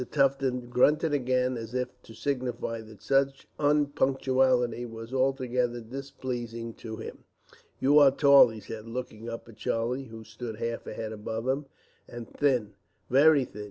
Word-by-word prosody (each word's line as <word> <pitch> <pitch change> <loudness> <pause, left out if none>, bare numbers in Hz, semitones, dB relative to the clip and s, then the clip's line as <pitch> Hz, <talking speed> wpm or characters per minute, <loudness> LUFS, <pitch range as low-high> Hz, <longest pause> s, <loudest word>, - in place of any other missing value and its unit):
Tufton 135 -2 +1
grunted 150 +6 +3
again 130 -2 +1
as 115 +1 -7
if 125 0 -3
to 110 - -14
signify 125 -4 -3
that 110 -1 -14
such 135 0 +1
unpunctuality 130 -4 +2
was 115 +1 -8
altogether 125 -2 0
displeasing 120 -2 -6
to 110 -1 -6
him. - - -8 0.6
"You 145 +3 +5
are 145 -2 +8
tall," 140 0 +7
he 110 -2 -8
said, 110 +1 -8
looking 115 -1 -6
up 115 0 -7
at 115 - -14
Charlie, 125 +4 -1
who 115 -2 -10
stood 110 +1 -7
half 115 +1 -4
a - - -6
head 110 -1 -4
above 110 +2 -5
him, 135 +2 -1 0.4
"and 120 -1 -8
thin, 125 -8 0 0.4
very 140 +1 +6
thin. 105 - -12
125 Hz, 155 wpm, -28 LUFS, 115-135 Hz, 0.6 s, are